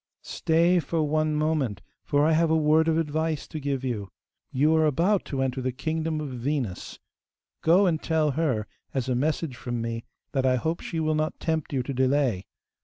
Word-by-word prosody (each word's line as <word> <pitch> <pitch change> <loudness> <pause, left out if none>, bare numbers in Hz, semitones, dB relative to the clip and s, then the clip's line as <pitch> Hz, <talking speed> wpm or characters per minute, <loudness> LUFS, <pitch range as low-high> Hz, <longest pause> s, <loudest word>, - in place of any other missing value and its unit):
'Stay 170 +2 +2
for 160 +1 -1
one 155 +1 +1
moment, 150 - 0 0.2
for 145 +1 +2
I 160 - +3
have 165 +1 +3
a 160 - +3
word 155 +1 +3
of 160 -1 +2
advice 160 -1 -1
to 155 - -6
give 140 -2 -2
you. 110 -7 -3 0.4
You 150 +5 +3
are 160 -1 +4
about 175 +8 +2
to 135 -2 -2
enter 130 0 -2
the 130 0 -1
kingdom 160 +4 -2
of 150 -2 -4
Venus;(4) 125 -5 -3 0.6
go 180 +5 +5
and 165 -4 +1
tell 155 -2 +1
her, 135 -8 0 0.3
as 130 -2 -1
a 130 - +1
message 145 +2 -1
from 120 -2 -4
me, 115 0 -3 0.3
that 135 -2 0
I 130 -1 +3
hope 160 +7 -1
she 165 - -4
will 155 0 +1
not 155 0 -1
tempt 160 -2 -2
you 135 -3 0
to 140 - -4
delay. 130 -6 +1
150 Hz, 195 wpm, -26 LUFS, 130-160 Hz, 0.6 s, go